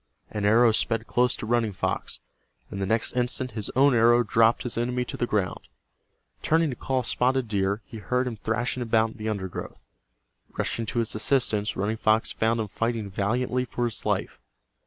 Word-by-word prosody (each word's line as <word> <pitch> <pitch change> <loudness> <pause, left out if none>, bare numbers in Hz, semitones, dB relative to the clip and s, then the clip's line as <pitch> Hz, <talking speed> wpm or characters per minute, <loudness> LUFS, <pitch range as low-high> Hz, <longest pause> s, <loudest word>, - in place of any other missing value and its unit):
An 105 -1 -2
arrow 115 +3 +5
sped 115 +1 0
close 125 +2 +2
to - - -6
Running 115 -2 +1
Fox, - - -2 0.5
and 100 - -4
the 95 - -1
next 110 +2 0
instant 125 +1 0
his 110 -2 -3
own 135 +1 +5
arrow 120 +1 +5
dropped 115 0 +3
his 120 - -3
enemy 125 +1 -1
to - - -6
the 120 - -1
ground. 100 -6 -2 0.7
Turning 160 -1 +2
to - - -5
call 130 +1 -1
Spotted 130 +1 +1
Deer, 100 0 -1
he 115 - -9
heard 125 +5 0
him 125 -2 -3
thrashing 115 +4 -2
about 115 -1 +2
in - - -14
the 110 0 -3
undergrowth. 95 -4 -5 0.7
Rushing 115 -1 -1
to - - -4
his 115 -2 0
assistance, 110 -2 +1
Running 105 +3 -1
Fox 110 +1 +2
found 115 +1 +1
him 110 - -1
fighting 115 -1 -2
valiantly 125 +6 0
for 120 0 -2
his 115 -4 -4
life. - - -2
115 Hz, 185 wpm, -26 LUFS, 110-125 Hz, 0.7 s, arrow